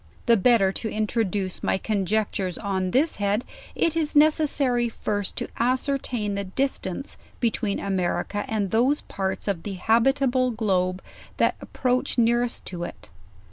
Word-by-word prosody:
The 235 - +6
better 205 -2 +4
to 220 +3 -4
introduce 210 -3 -1
my - - +1
conjectures 200 -2 -1
on 190 -2 -1
this 280 - +2
head, 205 +3 0 0.3
it 330 -1 +1
is 310 -3 -1
neces 310 +1 +5
sary 245 -4 +2
first 205 -3 -2
to - - -2
ascertain 250 -3 0
the 200 0 -2
distance 260 0 -3 0.2
between 225 -3 0
America 195 +1 -1
and 205 -4 -1
those 255 +6 +3
parts 190 0 -4
of 195 -5 -1
the 205 - -5
habitable 255 +5 +2
globe 190 -5 0 0.3
that - - +3
approach 255 0 -1
nearest 240 +1 +1
to 175 -2 -5
it. 175 - -9
220 Hz, 140 wpm, -25 LUFS, 195-250 Hz, 0.3 s, The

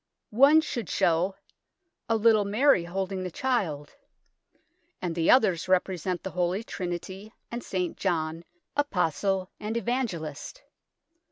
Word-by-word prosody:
One 280 +7 +7
should 240 -7 -4
show 175 +3 +1 0.4
" 355 -9 -53
a 225 - +3
little 220 -1 +4
Mary 210 -1 +3
holding 190 +1 -3
the 185 - -3
Child," 175 - -2 1.1
and 175 -2 -3
the 165 -1 0
others 190 -9 +4
represent 185 -1 0
the 190 - -5
Holy 180 +4 -1
Trinity 190 +2 -6 0.2
and 235 0 -5
St. 180 -2 -2
John, 165 -3 -1 0.3
Apostle 195 - 0
and 220 +2 -3
Evangelist. 230 - -3
190 Hz, 120 wpm, -27 LUFS, 175-230 Hz, 1.1 s, One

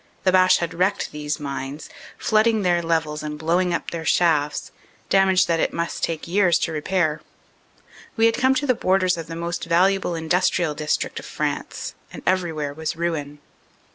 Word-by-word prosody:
The 185 - +3
Boche 185 0 +5
had 170 0 -3
wrecked 190 +3 0
these 150 0 -4
mines, 140 +1 -5 0.3
flooding 220 0 +2
their 175 -1 +2
levels 160 -2 -1
and 150 0 -5
blowing 175 +4 +1
up - - -2
their 165 -1 -4
shafts, 155 -4 +1 0.4
damage 190 -1 +4
that 165 -1 0
it - - 0
must 170 0 -3
take 165 -1 -2
years 180 -1 +3
to 165 - 0
repair. 160 0 0 1.0
We 225 - +4
had 230 - +4
come 260 +1 +3
to 285 - 0
the 255 - +3
borders 185 -4 +2
of 165 -1 -7
the 165 - -6
most 170 +1 -4
valuable 180 +1 +2
industrial 165 0 +1
dis 150 0 0
trict - - -5
of - - -10
France, - - -4 0.2
and - - -10
everywhere 165 -6 0
was 160 +2 -4
ruin. 160 -4 -3
170 Hz, 175 wpm, -23 LUFS, 155-185 Hz, 1.0 s, Boche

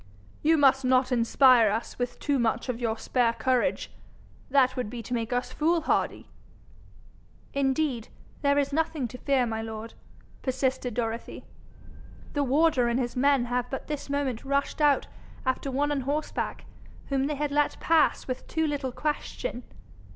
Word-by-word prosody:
'You 320 +1 +4
must 270 -2 +4
not 255 0 +3
inspire 240 -1 +5
us 220 +4 -3
with 245 0 -2
too 285 -2 0
much 235 +2 0
of 240 -2 -2
your 225 -2 -1
spare 240 -1 +1
courage. 245 +2 0 0.6
That 260 -1 +3
would 250 -5 -3
be 235 0 -6
to 245 - -6
make 230 -1 -2
us 245 0 -1
fool 330 +2 +2
hardy.' - - -1 1.3
'Indeed, 270 -3 0 0.3
there 280 0 +3
is 280 0 +1
nothing 310 -4 0
to 250 - -9
fear, 270 -3 +2
my 225 -1 -3
lord,' 225 0 -7 0.5
persisted 260 -2 -1
Dorothy. 230 -1 -4 0.9
'The 290 - +1
warder 275 -2 +3
and 235 +2 +1
his 240 -2 -2
men 275 -1 +3
have 245 0 -2
but 270 - -5
this 295 -2 -5
moment 280 -5 -1
rushed 280 +2 -1
out 290 -2 +4 0.4
after 260 +1 -1
one 285 +3 0
on 285 -2 0
horseback, 290 +4 -3 0.4
whom 275 -1 +1
they 300 - -2
had 295 0 -2
let 290 0 +1
pass 325 -1 +2
with 255 -1 -5
too 320 -1 0
little 285 -4 -2
question. 300 - -3
260 Hz, 160 wpm, -27 LUFS, 245-285 Hz, 1.3 s, inspire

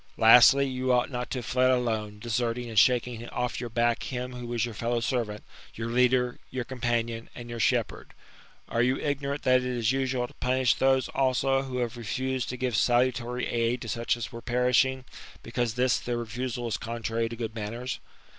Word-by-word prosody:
Lastly, 125 +5 +7
you 130 0 -1
ought 125 +2 +2
not 125 -1 -4
to - - -3
have 120 - -5
fled 130 +1 +2
alone, 110 -5 0
desart 115 +1 -1
ing 120 -1 -5
and 110 -3 +3
shaking 120 -1 +2
off 125 0 -2
your 120 - -4
back 120 0 +1
him 125 -1 -4
who 125 -1 -7
was 120 -1 0
your 120 - -6
fellow 120 +2 -1
servant, 115 -3 -2 0.3
your 115 +1 -4
leader, 125 0 +2
your 130 -1 -3
companion, 120 -2 -2
and 120 -1 -8
your 120 - -5
shepherd. - - 0 0.5
Are 115 - 0
you 125 +2 +3
ig 145 -2 -2
norant 140 +1 -3
that 130 0 +5
it 125 - -5
is 120 -2 0
usual 130 -2 -1
to - - -17
punish 130 0 +2
those, 135 0 +2
also, 135 0 +1
who 130 -2 -5
have 120 0 -2
refused 130 +2 -2
to 125 - -4
give 125 -2 -1
salutary 125 +1 +1
aid 120 +1 0
to - - -7
such 115 +2 -1
as 110 -2 -5
were 115 - -8
perishing, 125 +2 +2 0.4
because 120 -1 -2
this 125 0 +2
their 120 -1 -3
refusal 120 +1 -4
is 115 - -1
contrary 115 0 -3
to 115 - -6
good 115 -2 -4
manners 115 +3 -4
120 Hz, 200 wpm, -27 LUFS, 115-130 Hz, 0.5 s, Lastly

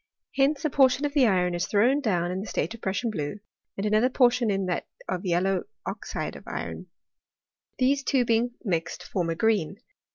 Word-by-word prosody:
Hence 280 +3 +2
a 305 - +1
portion 265 0 +4
of 285 - -2
the 275 -5 +5
iron 180 -3 +2
is 175 0 -1
thrown 240 +7 +3
down 175 -7 0
in 185 - -2
the 205 - -6
state - - -2
of 230 - -11
Prussian 200 +5 -1
blue, 150 0 -4 0.4
and 195 - -2
another 215 +4 +3
por 250 -2 +5
,tion 240 -2 0
in 195 -1 0
that 180 -2 -2 0.2
of 185 +1 -3
yellow 180 +2 +1 0.2
oxide - - -4
of - - -12
iron: - - -5 0.9
these 275 +2 +2
two 255 -2 +2
being 235 +1 +1
mixed 170 -7 -2
form 175 -3 -2
a 165 - -1
green. 200 -3 +1
215 Hz, 195 wpm, -26 LUFS, 185-255 Hz, 0.9 s, the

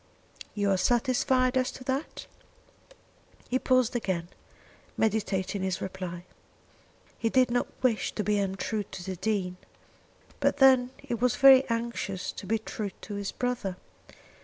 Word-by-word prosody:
"You 205 -1 +1
are 190 - +3
satisfied 255 +4 +2
as 255 -1 +1
to 255 - -10
that?" 265 +4 -3 1.2
He 255 - +1
paused 255 -2 +2
again, 185 -7 -2 0.7
meditating 205 -3 0
his 190 -1 -1
reply. 180 -2 -6 0.9
He 230 - +1
did 255 0 +3
not 245 - +1 0.2
wish 235 -4 +1
to 210 - -2
be 210 0 +1
untrue 195 +2 -2
to 190 -2 -8
the 190 0 -4
Dean, 185 -2 -2 0.8
but - - +2
then 260 -3 +6
he 275 -3 -6
was 240 +1 +1
very 270 -1 +7
anxious 230 -5 -2
to 190 - -9
be 225 +3 +2
true 215 -1 -5
to 210 - -7
his 200 -1 -3
brother. 245 -7 -2
220 Hz, 140 wpm, -28 LUFS, 190-250 Hz, 1.2 s, very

